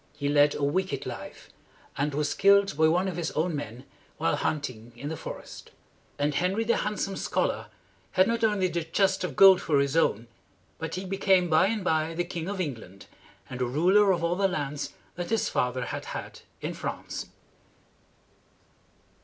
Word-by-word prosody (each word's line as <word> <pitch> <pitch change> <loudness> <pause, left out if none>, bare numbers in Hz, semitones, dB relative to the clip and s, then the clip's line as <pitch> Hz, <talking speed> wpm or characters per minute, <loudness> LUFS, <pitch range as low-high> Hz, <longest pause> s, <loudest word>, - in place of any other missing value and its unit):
He 140 -1 -1
led 145 0 +4
a 145 - -3
wicked 145 -1 -1
life, - - -8 0.4
and 140 0 -1
was 150 0 0
killed 200 -3 +4
by 160 +1 +4
one 180 +4 +2
of 180 -3 -4
his 165 -2 -1
own 160 +1 0
men 125 -3 -6 0.3
while 85 - +1
hunting 125 -6 -3
in 140 +5 -6
the 160 - -3
forest. - - -9 0.5
And 145 +1 0
Henry, 185 +8 +1
the 235 +1 +2
Handsome 205 -2 -2
Scholar, - - -1 0.5
had 185 0 +4
not 230 0 -1
only 210 -4 +2
the 170 -2 -2
chest 190 +4 +1
of - - -3
gold 190 -2 +8
for 150 - +1
his 140 +1 0
own, 120 -8 +2 0.5
but 160 +1 -4
he 185 +1 -4
became 190 -2 +2
by 160 +4 +5
and 215 -1 -2
by 160 -1 0
the 175 - 0
King 175 0 -5
of 200 -1 -4
England 115 - -5 0.4
and 130 - -7
the 125 - +1
ruler 185 +10 +4
of 175 -2 0
all 170 +1 +1
the 195 +1 +2
lands 145 -5 -3 0.2
that 175 -1 -4
his 225 0 +1
father 125 0 -1
had - - -5
had - - -7 0.2
in - - -3
France. - - -5
165 Hz, 180 wpm, -27 LUFS, 145-190 Hz, 0.5 s, gold